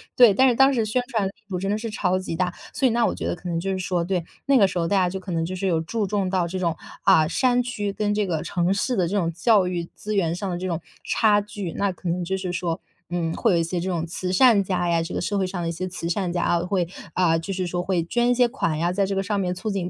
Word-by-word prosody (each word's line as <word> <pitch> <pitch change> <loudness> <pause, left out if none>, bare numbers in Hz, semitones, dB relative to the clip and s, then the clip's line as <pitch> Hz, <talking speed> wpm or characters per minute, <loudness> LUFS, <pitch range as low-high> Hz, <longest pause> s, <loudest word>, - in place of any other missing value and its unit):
对， 240 -5 +7
但 260 +7 +5
是 245 - +2
当 270 +2 +5
时 230 -4 +1
宣 220 +4 0
传 215 -4 0
力 - - -5 0.2
度 185 -2 -2
真 195 +2 -2
的 210 - +1
是 225 +1 -4
超 185 -3 +1
级 185 -3 -4
大。 180 -1 0 0.2
所 270 - +2
以 - - +2
那 235 0 +2
我 - - +1
觉 - - -4
得 - - -1
可 175 +1 -7
能 165 -1 -1
就 195 +3 -3
是 190 - -3
说 180 -1 -1
对， 180 0 -1 0.2
那 275 -1 +4
个 205 - +6
时 185 - -3
候 165 - 0
大 200 - +1
家 185 -2 +3
就 190 +2 -4
可 185 0 -8
能 165 -1 0
就 185 +3 -4
是 195 - -1
有 165 -3 +1
注 205 +5 -2
重 195 -1 0
到 185 -2 +1
这 185 +2 -4
种， 170 -3 +1 0.3
啊， 155 -1 +5
山 245 +6 +2
区， 210 -5 -3
跟 205 +1 -1
这 210 0 +1
个 165 -5 -1
城 175 +2 0
市 225 +5 0
的 180 -5 +1
这 205 - 0
种 170 -4 +1
教 190 +2 +3
育 175 -1 -2
资 215 0 -4
源 170 -5 +1
上 190 +2 -4
的 175 - -2
这 185 +1 -3
种 170 -3 -2 0.2
差 210 -2 +3
距。 205 -4 -6
那 200 -1 0
可 185 0 -8
能 175 +1 -1
就 190 +2 -2
是 185 -2 -4
说， 170 -1 -2 0.3
嗯， 170 -2 -1
会 - - +2
有 - - +3
一 165 - +2
些 175 +2 -2
这 185 - -2
种 170 -3 -1
慈 180 +2 -3
善 215 0 +5
家 180 -2 -1
呀 165 -1 +2
这 165 - -6
个 - - -1
社 205 - -1
会 195 - +1
上 185 -1 -4
的 170 - -2
一 - - -1
些 185 +3 -4
慈 180 -2 -5
善 180 0 -1
家 175 0 -1
啊， 170 - +2
会， 180 -1 0 0.3
啊， 170 -3 +3
就 165 +4 -4
是 185 -1 -2
说 175 +1 -2
会 180 -2 0
捐 240 +7 +1
一 - - +4
些 245 0 +4
款 165 - -2
呀， 175 +2 +1
在 200 +1 +1
这 195 0 -2
个 195 - +1
上 205 +1 -1
面 180 -2 0
促 185 +5 -4
进 190 -3 -2
185 Hz, 340 characters per minute, -24 LUFS, 175-205 Hz, 0.3 s, 对